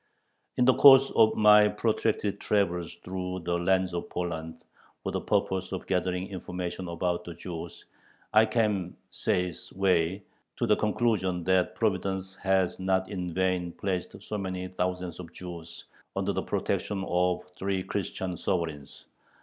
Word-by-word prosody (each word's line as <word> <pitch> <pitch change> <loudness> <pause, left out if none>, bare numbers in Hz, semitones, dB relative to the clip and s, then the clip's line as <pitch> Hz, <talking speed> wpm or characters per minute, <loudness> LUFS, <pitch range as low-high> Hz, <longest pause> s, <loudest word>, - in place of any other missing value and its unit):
In 125 - +4
the 130 - +6
course 135 0 +8
of 110 -1 +4
my 105 0 +7
protracted 105 -1 0
travels 90 -5 0
through 90 +1 -5
the 85 +1 -2
lands 95 +1 +2
of 85 - -4
Poland, 80 -2 -4 0.5
for - - -2
the - - -2
purpose 95 -1 0
of 95 - -4
gathering 90 0 -1
information 90 -1 -5
about 85 +1 -1
the 85 - -8
Jews, 85 -1 -7 0.5
I 110 +1 +6
came 105 -6 0
says 90 -1 -1
Way 95 0 +1 0.3
to - - +1
the - - +4
conclusion 105 -5 0
that 95 0 +2
Providence 95 -3 -1
has 95 -1 +1
not 95 0 0
in 90 -3 -3
vain 90 -1 0
placed 95 -3 -3
so 105 - -4
many 95 -1 -4
thousands 90 -1 -3
of 85 -2 -8
Jews 85 -2 -9 0.3
under - - 0
the - - -1
protection 95 -2 -2
of 90 0 +1
three 95 0 -1
Christian 95 -2 -3
sovereigns. 80 -7 -3
95 Hz, 145 wpm, -28 LUFS, 90-100 Hz, 0.5 s, course